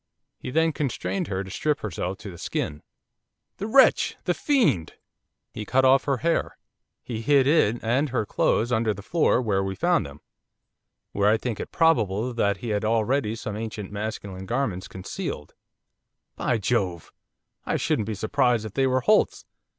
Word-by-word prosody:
'He - - -6
then 160 +4 +2
constrained 150 +6 -2
her 95 -1 -2
to 95 - -10
strip 150 +7 -1
herself 95 -2 -4
to 100 - -9
the 85 - -12
skin 75 0 -3 0.4
' - - -57
'The 205 - -4
wretch!' 265 +4 +4
'The - - +1
fiend!' 160 - +1 0.6
'He 105 - -5
cut 130 +5 +2
off 130 +1 +5
her 140 -2 +1
hair; 170 - 0 0.5
he 115 -3 -5
hid 135 +2 +4
it 140 -7 +3
and 130 +6 +1
her 120 -4 -1
clothes 115 +3 +1
under 110 -3 +1
the 100 - -10
floor 160 +1 +2
where 100 -4 +1
we 95 0 -3
found 170 - +1
them 75 +2 -13 0.9
where 100 +1 +2
I 110 - +4
think 115 -1 -4
it - - -6
probable 120 - +2
that 100 -4 +1
he 115 - -6
had 105 -1 -1
already 110 +1 +1
some 105 -2 -5
ancient 105 -2 -6
masculine 100 -2 -5
garments 115 -7 -2
concealed 95 -1 -6 0.4
' - - -57
'By 120 - 0
Jove! 95 -6 -1 0.5
I - - +1
shouldn't 105 - 0
be 110 - -3
surprised 120 +1 +1
if 105 - -7
they 135 +2 +2
were 130 0 +1
Holt's. 215 +11 +2
110 Hz, 175 wpm, -25 LUFS, 100-135 Hz, 0.9 s, off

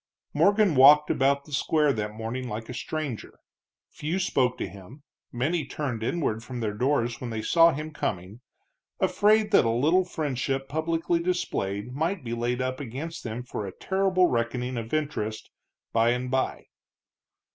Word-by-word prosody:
Morgan 205 -2 +4
walked 150 +3 +7
about 140 +1 +2
the 150 - -15
square 150 0 +2
that 105 -2 -4
morning 120 +3 -4
like 110 +2 -6
a - - -5
stranger. 145 -3 -5 0.5
Few 160 +5 -3
spoke 130 -9 +1
to - - -3
him, 100 +9 -13 0.3
many 150 +7 0
turned 135 -4 -4
inward 115 -3 -1
from 125 -1 -6
their 110 -3 -2
doors 120 0 0
when 125 - -4
they 110 -1 -4
saw 170 0 +5
him 155 +1 -5
coming, 100 - -4 0.6
afraid 210 0 +3
that 200 - +6
a 115 - +1
little 150 +11 +3
friendship 135 -5 -2
publicly 165 +3 0
displayed 125 - -2
might 165 +4 -1
be 115 -1 -4
laid 120 +2 -1
up 130 0 -3
against 145 +6 -6
them 115 +1 -5
for 110 -4 -5
a - - -6
terrible 190 -1 +2
reckoning 125 -1 -1
of 115 -1 -5
interest 140 -8 -3 0.4
by 115 +1 +4
and 125 +1 -1
by. 130 0 -1
130 Hz, 160 wpm, -26 LUFS, 115-155 Hz, 0.6 s, walked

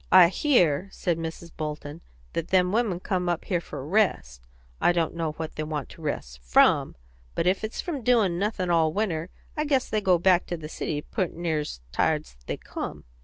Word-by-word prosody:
"I 180 -2 +9
hear," 185 - +2
said 175 -4 -1
Mrs. 165 +1 -6
Bolton, 150 0 -5 0.3
"that 165 - -2
them 180 -1 +3
women 215 -5 +1
come 180 -1 -1
up 170 -1 -1
here 180 -4 0
for 135 - -7
rest. 105 - 0 0.3
I 175 - +5
don't 170 -2 0
know 165 -2 -2
what 160 0 -5
they - - -1
want 150 -3 -4
to - - -13
rest 65 - -4
from; - - +4 0.4
but - - 0
if 185 +3 +2
it's 215 - -3
from 315 -7 -4
doin' 220 -8 +3
nothin' 195 -3 0
all 160 -2 +4
winter 180 -5 -1 0.3
long, 300 - -1
I - - -4
guess 270 -3 +2
they 215 - 0
go 185 -3 +4
back 180 +1 +3
to 175 - -3
the 155 -1 -7
city 150 -2 -3
poot' 185 -4 -2
near's 155 - -2
tired's - - 0
they - - -2
come." - - -6
170 Hz, 200 wpm, -26 LUFS, 155-190 Hz, 0.4 s, I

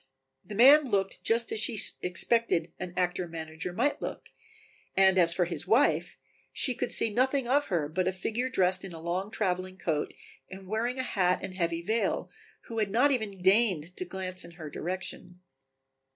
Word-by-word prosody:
The 210 - -8
man 280 +7 +7
looked 195 -5 -1
just 230 +1 +1
as - - -1
she 220 0 -1 0.2
expected 180 -3 +1
an 180 - -5
actor 180 0 0
manager 160 +1 -6
might 250 +11 0
look, - - -6 0.7
and 190 -1 +6
as 170 -3 +5
for 175 +1 +1
his 170 0 -2
wife, 230 +8 +2 0.3
she 255 - +1
could - - -3
see 225 - +1
nothing 260 +2 +1
of 285 +3 +2
her 165 -5 -1
but 180 +4 -1
a - - +2
figure 225 +7 -3
dressed 185 -5 +1
in 190 -3 -8
a 165 - -8
long 175 +4 -3
traveling 185 -3 -2
coat 160 -4 -2 0.4
and 190 0 -10
wearing 230 +5 -1
a 260 - -1
hat 180 -7 +1
and 190 -1 -5
heavy 170 -2 -2
veil, 220 +6 -1 0.3
who 225 -1 -6
had 210 -2 0
not 250 +8 +3
even 210 -8 -3
deigned 190 -4 +2
to - - -3
glance 185 0 -5
in 170 0 -12
her 155 -4 -8
direction. 180 0 -5
190 Hz, 180 wpm, -29 LUFS, 180-225 Hz, 0.7 s, man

